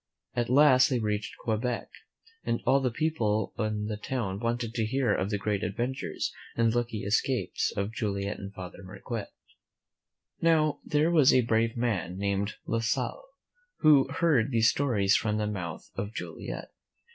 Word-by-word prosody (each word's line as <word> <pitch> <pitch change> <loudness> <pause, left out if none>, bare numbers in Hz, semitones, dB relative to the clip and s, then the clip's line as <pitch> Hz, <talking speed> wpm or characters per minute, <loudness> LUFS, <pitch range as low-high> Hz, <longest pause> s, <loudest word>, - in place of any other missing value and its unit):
At 120 -1 -1
last 130 -1 +6
they 130 - +1
reached 105 -2 -2
Quebec, 115 +2 -1 0.6
and 115 - 0
all 135 - +5
the 130 -2 +1
people 115 -6 0
in 105 -2 -1
the 105 0 -3
town 105 -4 -3
wanted 115 0 -2
to 115 -2 0
hear 125 -2 +1
of 95 - -1
the 105 - 0
great 100 0 -1
adven 120 +5 -1
tures - - -3 0.2
and 115 -1 +2
lucky 120 -3 -1
escapes 115 +5 0
of 100 +2 -2
Joliet 100 -3 -2
and 100 0 -7
Father 95 -1 -9
Marquette. 100 +3 -6 1.1
Now, 155 -2 +3
there 150 +3 +2
was 150 -6 +6
a 130 - +5
brave 115 0 +1
man 100 -7 -1
named 100 +1 -1
La 115 - 0
Salle, 115 - -1 0.6
who 145 -3 +6
heard 140 -6 +2
these 115 -3 +4
stories 105 -8 +2
from 105 -1 +1
the 105 - 0
mouth 90 -6 -5
of 105 +3 -5
Joliet. - - -6
115 Hz, 160 wpm, -28 LUFS, 105-125 Hz, 1.1 s, last